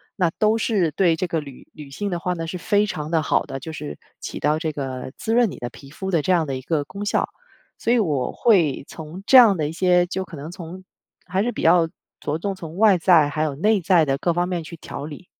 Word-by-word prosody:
那 175 -4 +1
都 215 +1 +3
是 210 -7 +1
对 170 +2 +2
这 180 +3 -2
个 165 -1 -1
女 140 -4 -11
女 145 -2 -11
性 205 +8 -3
的 175 - -2
话 180 +1 -1
呢， 165 -2 -5
是 180 - -4
非 205 +3 +1
常 155 -5 -5
地 165 -2 +2
好 - - +1
的， 135 - -6
就 160 +5 -7
是 75 - -7 0.2
起 - - -6
到 150 +2 +2
这 160 -1 -2
个 130 -3 -5
滋 225 - -2
润 240 -4 +4
你 - - -9
的 120 - -4
皮 135 +3 -14
肤 190 +5 -5
的 165 -5 +1
这 185 - +1
样 170 -4 +2
的 135 - -2
一 - - -7
个 150 +1 0
功 200 +8 -7
效， - - 0 0.5
所 235 - +1
以 245 - +3
我 145 - 0
会 175 - +2
从 160 +3 -9
这 265 - +8
样 230 -6 +8
的 155 -4 -1
一 - - -5
些 180 +1 +3
就 190 +1 -3
可 170 - -10
能 150 +2 -7
从 175 +1 -9 0.4
还 185 +2 0
是 245 - 0
比 - - -6
较 165 0 +5 0.3
着 150 +2 -3
重 195 +3 -3
从 165 -3 -9
外 210 -3 +5
在， 165 -4 +5
还 155 +2 -1
有 155 -2 -1
内 205 +9 +2
在 175 -1 +4
的 135 -2 0
各 170 +4 0
方 175 +1 0
面 175 -3 -2
去 170 - -9
调 145 - -7
理。 155 +4 -9
170 Hz, 280 characters per minute, -22 LUFS, 150-190 Hz, 0.5 s, 这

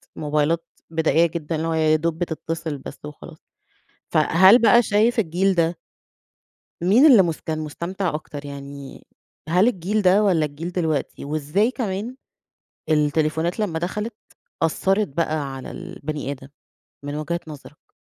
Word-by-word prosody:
موبايلات 150 +2 0 0.2
بدائية 160 0 +2
جدًا، 160 -1 -4
اللي 160 +1 -2
هو 165 - 0
يا 155 -1 +3
دوب 160 +1 -1
بتتصل 165 -2 -4
بس 140 - -10
وخلاص. 150 +2 -11 0.7
فهل 185 +8 +6
بقى 235 +1 +6
شايف 220 +3 +2
الجيل 190 0 +1
ده 165 0 +1 1.0
مين 215 - +5
اللي 245 -10 +8
مس 165 -3 -2
كان 155 -1 -3
مستمتع 170 +3 -3
أكتر 150 -1 -6
يعني، 140 -1 -9 0.4
هل 180 +7 +4
الجيل 205 0 -1
ده 190 +2 +5
والّا 180 -7 +3
الجيل 155 +5 -7
دلوقتي؟ 160 -7 -2
وإزاي 155 - 0
كمان 230 -1 -4 0.7
التليفونات 155 +3 +1
لما 180 -7 -1
دخلت، 210 +7 -3 0.5
أثّرِت 195 +6 +1
بقى 150 -2 -2
على 130 - -8
البني 150 -1 -6
آدم؟ 135 -1 -9 0.6
من 145 0 -5
وجهة 160 +3 -3
نظرك. 150 0 -13
165 Hz, 135 wpm, -22 LUFS, 150-190 Hz, 1.0 s, اللي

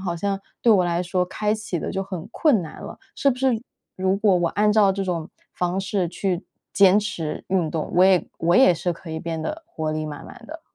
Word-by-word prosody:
好 180 -3 -2
像 195 +3 -2 0.2
对 235 - +6
我 190 -4 +4
来 175 0 0
说， 180 0 0
开 210 +3 -1
启 210 -6 -4
得 - - -3
就 195 - -2
很 185 -4 -7
困 260 - +2
难 160 - -9
了， - - -9 0.2
是 280 - +3
不 245 - -2
是 255 -4 +1 0.4
如 190 +1 +1
果 200 -2 +3
我 175 -1 +1
按 210 +1 +2
照 205 -2 +4
这 195 +1 -3
种 170 -3 -3 0.3
方 180 +2 -1
式 195 -2 -1
去 180 +1 -2 0.3
坚 195 0 +6
持 180 -7 -4
运 185 -4 +1
动， 160 -1 -3
我 180 - +7
也 190 -2 +4
我 170 +2 +2
也 260 -8 +7
是 175 +2 -2
可 165 0 -11
以 160 - -3
变 165 -1 -4
得 310 - -4
活 160 - -4
力 155 0 -2
满 145 -1 -7
满 245 -1 -12
的？ 320 +2 -9
185 Hz, 250 characters per minute, -23 LUFS, 170-210 Hz, 0.4 s, 我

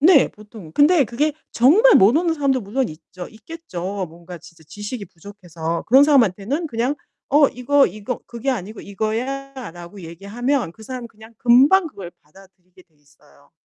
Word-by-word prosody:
네 310 -2 +6
보통. 210 -6 -14
근데 295 - +4
그게 290 +7 -1 0.2
정말 375 - +5
모르는 315 - +4
사람도 275 -4 0
물론 245 +5 -2
있죠. 175 +3 -11
있겠죠. 205 - -6
뭔가 170 +2 -12
진짜 170 0 -17
지식이 205 - -7
부족해서. 170 -3 -6
그런 265 +5 +6
사람한테는 265 - +2
그냥 245 0 -1 0.3
"어 290 0 +5
이거 275 +3 +2
이거 215 +5 -5
그게 235 +3 -3
아니고 215 -3 -5
이거야."라고 220 -3 -5
얘기하면 200 - -3
그 220 - -16
사람은 250 +1 -7
그냥 220 +1 -17
금방 275 +10 +5
그걸 195 - -9
받아들이게 185 +2 -21
돼 165 - -41
있어요. 145 -1 -26
220 Hz, 350 characters per minute, -21 LUFS, 180-275 Hz, 0.3 s, 네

